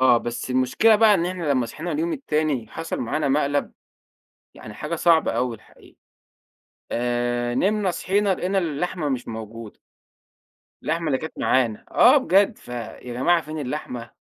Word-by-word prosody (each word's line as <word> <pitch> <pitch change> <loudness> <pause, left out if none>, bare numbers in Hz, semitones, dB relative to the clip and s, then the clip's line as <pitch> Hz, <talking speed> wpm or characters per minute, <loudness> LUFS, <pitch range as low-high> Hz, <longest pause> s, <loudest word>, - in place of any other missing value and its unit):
آه 130 -2 +6
بس 120 +2 -5
المشكلة 130 - +4
بقى 215 -1 +6
إن 175 -3 +1
إحنا 180 -1 -4
لمّا 130 -3 +1
صحينا 160 +9 -5
اليوم 165 +3 -1
التاني 150 - -1
حصل 165 - -5
معانا 145 +5 -1
مقلب، 145 0 0 0.8
يعني 105 - -11
حاجة 150 +10 -4
صعبة 165 0 +3
أوي 125 -2 -1
الحقيقة. 110 - -21 0.9
آآ، 120 0 -1
نمنا 200 +5 +1
صحيّنا 195 +2 +1
لقينا 190 +3 -1
اللحمة 165 -2 -2
مش 130 -3 -3
موجودة. 110 -1 -8 1.0
اللحمة 165 +1 -1
اللي 135 -3 +1
كانت 160 - -8
معانا، 120 -5 +1
آه 255 +4 +6
بجد، 205 -5 +3
"فيا 120 -1 -7
جماعة 165 +8 +2
فين 155 +1 -7
اللحمة، 125 -4 -5
150 Hz, 150 wpm, -23 LUFS, 120-175 Hz, 1.0 s, آه